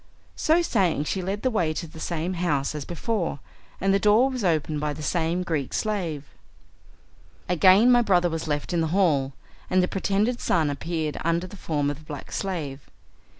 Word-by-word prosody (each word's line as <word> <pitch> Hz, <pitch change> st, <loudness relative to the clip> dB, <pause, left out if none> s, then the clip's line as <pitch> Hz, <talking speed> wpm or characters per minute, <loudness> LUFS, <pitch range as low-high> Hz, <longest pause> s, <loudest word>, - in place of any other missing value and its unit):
So 335 Hz, +2 st, +3 dB
saying 185 Hz, -, +1 dB
she 185 Hz, +5 st, -2 dB
led 195 Hz, +3 st, -3 dB
the 255 Hz, -, +2 dB
way 175 Hz, -8 st, +1 dB
to 160 Hz, -, -3 dB
the 160 Hz, 0 st, -12 dB
same 170 Hz, +2 st, -2 dB
house 155 Hz, -6 st, 0 dB
as 150 Hz, -2 st, -5 dB
before, 175 Hz, -, -2 dB, 0.4 s
and 195 Hz, +1 st, +2 dB
the 195 Hz, -, +3 dB
door 215 Hz, +6 st, +4 dB
was 255 Hz, -4 st, -4 dB
opened 155 Hz, -4 st, 0 dB
by 150 Hz, 0 st, -1 dB
the 150 Hz, +1 st, -8 dB
same 170 Hz, +3 st, 0 dB
Greek 155 Hz, -6 st, -2 dB
slave. 175 Hz, -9 st, -2 dB, 1.2 s
Again 190 Hz, +7 st, +6 dB
my 245 Hz, 0 st, +6 dB
brother 180 Hz, -6 st, +3 dB
was 165 Hz, -1 st, -4 dB
left 145 Hz, +3 st, -2 dB
in 170 Hz, -, +2 dB
the 160 Hz, -, +1 dB
hall, 140 Hz, -8 st, +2 dB, 0.4 s
and 185 Hz, 0 st, +3 dB
the -, -, +1 dB
pretended 205 Hz, +6 st, 0 dB
son 155 Hz, -4 st, +1 dB
appeared 155 Hz, +1 st, -3 dB
under 170 Hz, +2 st, +1 dB
the 185 Hz, -, -10 dB
form 145 Hz, -6 st, -1 dB
of 145 Hz, -, -8 dB
the -, -, -16 dB
black 145 Hz, -3 st, -8 dB
slave. 155 Hz, -8 st, -4 dB
170 Hz, 190 wpm, -25 LUFS, 150-195 Hz, 1.2 s, Again